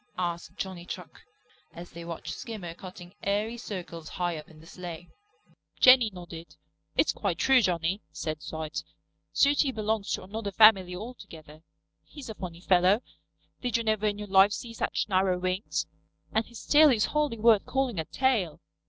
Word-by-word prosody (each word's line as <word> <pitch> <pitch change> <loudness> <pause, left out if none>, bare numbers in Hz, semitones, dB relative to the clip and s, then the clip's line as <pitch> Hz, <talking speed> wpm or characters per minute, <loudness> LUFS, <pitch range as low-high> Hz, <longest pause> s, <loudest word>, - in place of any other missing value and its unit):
asked 175 -2 -3
Johnny 185 -2 -5
Chuck, - - -9 0.5
as 175 +1 -9
they 170 - -9
watched 165 -2 -6
Skimmer 195 -6 -7
cutting 180 0 -11
airy 210 +3 -1
circles 175 -8 -7
high 175 -2 -2
up 150 -1 -9
in 155 -2 -16
the 160 - -15
slay. 175 0 -8 0.7
Jenny 255 -3 +7
nodded. 170 -2 -10 0.4
"It's - - +3
quite - - -2
true, 265 -1 +5
Johnny," 180 0 0
said 155 -1 -4
site. 160 0 -5 0.5
"Sooty 280 0 +3
belongs 215 -3 -2
to - - -3
another 205 +2 -5
family 195 -3 +6
altogether. 165 -8 -10 0.4
He's 275 -6 -9
a - - -6
funny 175 -4 -8
fellow. 185 +4 +4 0.6
Did 245 -3 0
you 230 - -2
ever 215 -1 +1
in 205 -1 -1
your 210 0 -6
life 195 +1 +5
see 230 +2 -6
such - - -1
narrow 185 -2 +2
wings? 185 +3 -2 0.5
And 220 +1 +1
his 235 - -11
tail 300 +1 +7
is 225 -5 +3
hardly 300 -6 +1
worth 220 -2 +4
calling 265 -8 0
a 160 - -2
tail." 220 - 0
195 Hz, 165 wpm, -28 LUFS, 175-225 Hz, 0.7 s, Jenny